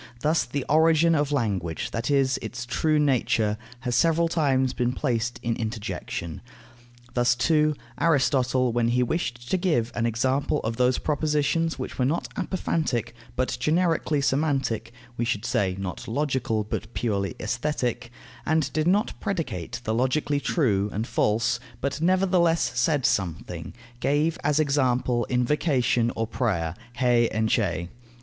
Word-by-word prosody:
Thus 155 +2 +2
the 135 +1 -3
origin 160 +2 +4
of 145 -2 +1
language, 100 - -1
that 115 +3 -2
is, 135 -2 +2
its 120 0 -5
true 155 +5 +1
nature, 120 -7 +2 0.3
has 125 -2 -2
several 165 +3 +3
times 135 -6 +1
been 125 0 0
placed 120 -4 -1
in 115 -1 0
interjection. 110 -7 -4 0.7
Thus, 120 0 +3
too, 150 +3 +2 0.2
Aristotle, 130 -5 +2
when 120 -1 +2
he 125 +1 +2
wished 125 -3 -3
to 190 - +3
give 155 -11 +1
an 120 0 0
example 130 +5 0
of 115 +1 -3
those 125 0 +3
propositions 155 +2 0
which 130 - -6
were 125 - +3
not 155 +6 0
apophantic, 155 - -1 0.2
but 130 0 0
generically 165 -2 +1
semantic 135 -5 0 0.3
(we 120 - 0
should 115 -4 -1
say, 95 -2 0
not 95 -2 -5
logical, 125 -4 0
but 105 - -5
purely 100 -2 -1
Aesthetic), 125 -2 -2 0.3
and 155 -3 0
did 155 +1 +1
not 205 +5 +2
predicate 165 - -3
the 110 - -1
logically 130 +4 +1
true 110 - +1
and 110 +3 -2
false, 115 +2 +1 0.2
but 140 +4 -2
nevertheless 180 -2 +3
said 135 +2 +1
something, 85 -4 -1 0.3
gave 150 +5 +1
as 150 +1 +2
example 130 -5 +1
invocation 125 -2 +1
or 115 - -1
prayer, 100 -9 -1 0.2
hae 120 -2 +3
enchae. 105 -6 0
130 Hz, 140 wpm, -25 LUFS, 115-150 Hz, 0.7 s, origin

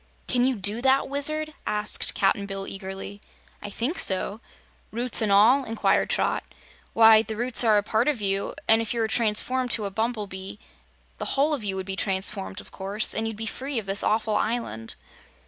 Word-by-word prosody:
"Can 245 -1 +2
you 260 0 +1
do 205 +3 +2
that, 265 +1 +2
Wizard?" 305 +2 0
asked 210 0 +1
Cap'n 200 +1 0
Bill, 195 -1 -4
eagerly. 195 +1 -7 0.4
"I 205 - -7
think 245 - -3
so." 200 +3 +1 0.5
"Roots 240 +1 +2
an' 215 - 0
all?" 220 +8 +5
inquired 225 -2 0
Trot. - - 0 0.5
"Why, 225 -1 +7
the 220 -1 -6
roots 240 +1 +2
are 220 -2 +4
now - - +5
a 205 - +1
part 220 +4 0
of 295 -5 0
you, 195 -1 -2
and 225 +1 +5
if 225 +1 -3
you - - -2
were 225 - +1
transformed 240 +3 +1
to 220 -3 +3
a 200 - -4
bumblebee 205 -3 -4 0.6
the - - -4
whole 295 +3 +2
of 275 -7 -3
you 195 -2 -2
would 190 -1 -5
be 195 0 -3
transformed, 195 0 -2
of - - -14
course, 200 +2 -1
and 220 +1 -2
you'd 225 -2 -5
be 225 - -4
free 265 +4 -5
of 220 - -3
this 195 0 0
awful 215 0 0
island." 215 - -2
220 Hz, 200 wpm, -25 LUFS, 200-240 Hz, 0.6 s, Why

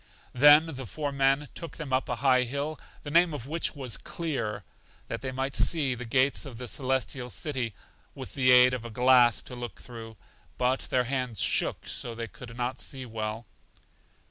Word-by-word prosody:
Then 145 +4 +7
the 135 -6 -7
four 145 - -3
men 135 +1 +2
took 165 - -7
them 145 -5 -5
up 130 +2 +1
a 125 - 0
high 130 -1 +5
hill, 140 +5 -3 0.2
the 145 - -6
name 170 0 +4
of 120 - -7
which 160 +3 -1
was 130 -5 -2
Clear, 115 - -4 0.5
that - - -4
they 130 - -3
might 135 +1 -3
see 145 -6 +2
the 125 0 -6
gates 130 +4 +2
of 135 -6 -8
The 125 +1 -6
Celestial 130 -1 -1
City, 130 - -2 0.4
with 130 -2 -8
the 130 -2 +2
aid 125 0 +7
of 125 -2 -3
a 120 - -7
glass 125 0 +4
to - - -10
look 120 -1 -7
through, 115 -2 -10 0.4
but 125 +1 0
their 125 -1 +2
hands 125 -4 -2
shook, - - +1
so 120 -2 -4
they 115 0 -4
could 115 +1 -11
not 125 +1 -2
see 130 -2 -5
well. 110 0 -5
130 Hz, 190 wpm, -28 LUFS, 120-140 Hz, 0.5 s, Then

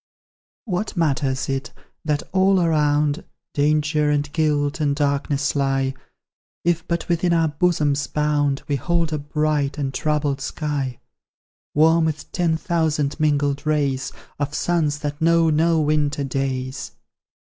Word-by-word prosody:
What 200 -1 -3
matters 140 -4 0
it, 135 +2 -3 0.3
that 150 -1 0
all 190 0 +4
around 150 -3 +2 0.3
Danger, 150 +1 +2
and 145 0 0
guilt, 150 -2 +1
and 145 -1 +1
darkness 140 0 0
lie, 135 -1 +1 0.7
If 170 -1 +1
but 170 -1 -2
within 175 0 +1
our 165 -1 +3
bosom's 150 -3 +1
bound 145 -2 0
We 145 -2 0
hold 165 +3 0
a 150 - -1
bright, 150 -1 -1
untroubled 145 0 -1
sky, 140 -4 -3 0.8
Warm 160 +2 +5
with 155 -2 -3
ten 170 -3 +1
thousand 160 -4 0
mingled 145 -2 +1
rays 140 -3 0 0.3
Of 145 +1 -2
suns 155 -4 +1
that 145 0 -4
know 165 0 +4
no 165 +2 +3
winter 150 -1 +1
days? 135 0 -3
150 Hz, 125 wpm, -22 LUFS, 140-160 Hz, 0.8 s, Warm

